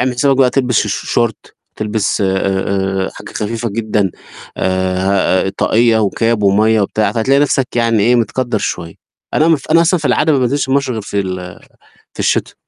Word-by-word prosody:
أعمل 125 0 +1
حسابك 135 +2 +2
بقى 130 -2 +4
تلبس 125 -4 +1
الش - - -3
شورت 115 -3 -2 0.2
تلبس 105 0 -1
آآ، 95 0 -1
حاجة - - -11
خفيفة 115 +2 -3
جدًا، 105 -3 -1 0.5
آآ، 95 +1 0
طاقية 115 0 +3
وكاب 110 +1 0
ومَيَّة 105 +3 +3
وبتاع، 105 +2 0
فهتلاقي 130 +5 +2
نفسك 135 -4 0
يعني 115 -2 +2
إيه 120 +3 +3
متكدر 120 0 -1
شوية. 85 -4 -4 0.4
أنا 155 +2 +3
مف 155 -2 0
أنا 165 - +5
أصلًا 175 +1 +2
في 150 - -1
العادة 150 +5 +2
ما 140 - +2
بانزلش 130 +2 0
مصر 135 -1 +1
غير 110 -2 -4
في 100 0 -2
ال 90 -1 -6 0.5
في - - -15
الشتاء. - - 0
110 Hz, 170 wpm, -15 LUFS, 100-125 Hz, 0.5 s, أنا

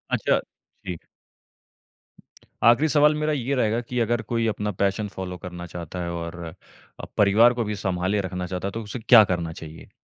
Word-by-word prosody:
अच्छा - - +2
ठीक। 90 -3 -11 1.6
आखरी 120 +7 +5
सवाल 150 +2 +4
मेरा 155 0 +1
ये 140 -1 -1
रहेगा 115 -2 +1
कि 125 -1 -1
अगर 120 0 +1
कोई 115 -1 +1
अपना 105 -1 -2
पैशन 100 +2 0
फ़ॉलो 95 -2 -6
करना 90 0 -8
चाहता 85 +1 -5
है 85 - -3
और 85 0 -6 0.6
अ, - - -6
परिवार 110 +4 +5
को 120 -1 -1
भी 105 -1 -3
सँभाले 95 0 -1
रखना 90 0 -4
चाहता 90 +1 -4
है। - - -3
तो 115 +2 -5
उसे 105 +4 -6
क्या 115 -1 +7
करना 85 -2 -3
चाहिए? 80 0 -11
105 Hz, 180 wpm, -24 LUFS, 90-120 Hz, 1.6 s, क्या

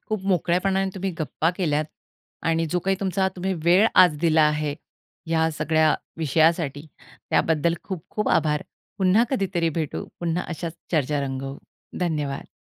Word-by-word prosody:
खूप 215 -3 -2
मोकळ्यापणाने 190 +2 +1
तुम्ही 190 0 -2
गप्पा 155 +2 0
केल्यात 155 -4 +1 0.7
आणि 165 0 +1
जो 180 - +1
काही 195 +1 0
तुमचा 190 0 +1
तुम्ही 190 +2 -1
वेळ 185 +6 +6
आज 180 -5 +6
दिला 160 -1 +4
आहे, 150 -1 +1 0.5
या 160 0 +2
सगळ्या 155 0 +3 0.2
विषयासाठी, 160 -1 +1 0.4
त्याबद्दल 165 +1 +2
खूप-खूप 190 +3 -4
आभार. 150 -1 0 0.4
पुन्हा 195 +5 +4
कधीतरी 190 -9 0
भेटू. 155 - -4 0.2
पुन्हा 170 +1 -1
अशाच 165 +1 -5 0.2
चर्चा 150 -3 +1
रंगवू. 135 +1 -5 0.4
धन्यवाद. 150 -5 -2
165 Hz, 135 wpm, -24 LUFS, 150-185 Hz, 0.7 s, वेळ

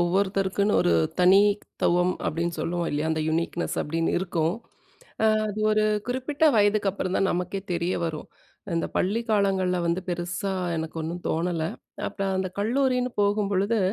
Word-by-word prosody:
ஒவ்வொருத்தருக்குன்னு 195 +3 +1
ஒரு 85 - +3 0.3
தனித்துவம் 185 -2 +3
அப்படின்னு 170 +2 -1
சொல்லுவோம் 170 +1 -1
இல்லையா? 150 +2 -1
அந்த 155 - -1
யுனிக்னஸ் 170 +1 -1
அப்படின்னு 165 +2 -1
இருக்கும். 170 -2 0 0.9
அது 210 +1 -5
ஒரு 215 0 +3 0.2
குறிப்பிட்ட 260 +5 -1
வயதுக்கு 205 -1 +3
அப்பறம் 190 -1 -2
தான் 195 - +2
நமக்கே 180 +2 -2
தெரிய 170 +1 0
வரும். 155 -2 -4 0.5
இந்த 165 - 0
பள்ளி 205 +5 +1
காலங்கள்ல 190 -3 +2
வந்து 170 +2 0
பெருசா 175 +2 -2 0.2
எனக்கு 160 +1 -4
ஒன்னும் 170 +2 -5
தோணல. 165 0 -1 0.4
அப்பறம் 195 -1 -2
அந்த 190 0 -1
கல்லூரின்னு 250 +3 +1
போகும்பொழுது, 205 +1 +1
185 Hz, 135 wpm, -25 LUFS, 170-205 Hz, 0.9 s, ஒரு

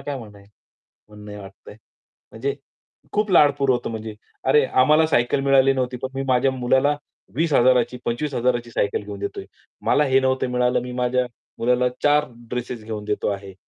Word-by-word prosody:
काय 145 -1 -4
म्हणणं 105 -4 -12
आहे 100 - -19 0.6
म्हणणं 105 -1 -10
वाटतंय. 100 +1 -13 0.6
म्हणजे 135 +5 -3 0.6
खूप 210 -1 0
लाडपूर 140 -4 +4
होतं 120 -2 0
म्हणजे 110 -1 -6 0.3
अरे, 140 +1 +4
आम्हाला 150 +6 +4
सायकल 125 -2 +1
मिळाली 135 0 +4
नव्हती, 125 -1 -2
पण 130 - -2
मी 135 - -2
माझ्या 130 +1 +3
मुलाला 130 +3 +2 0.4
20,000 130 -5 +4
ची 125 - -8
25,000 125 -1 0
ची 120 - -13
सायकल 105 -2 -1
घेऊन 100 0 -8
देतोय. 100 - -5 0.4
मला 150 - +4
हे 135 -1 +3
नव्हतं 130 -1 0
मिळालं, 125 0 +1
मी 125 0 -7
माझ्या 125 0 0 0.3
मुलाला 125 +1 +2
4 150 0 +3 0.2
ड्रेसेस 120 -2 -5
घेऊन 105 -2 -6
देतो 105 0 -1
आहे. 100 -1 -6
125 Hz, 165 wpm, -22 LUFS, 115-135 Hz, 0.6 s, लाडपूर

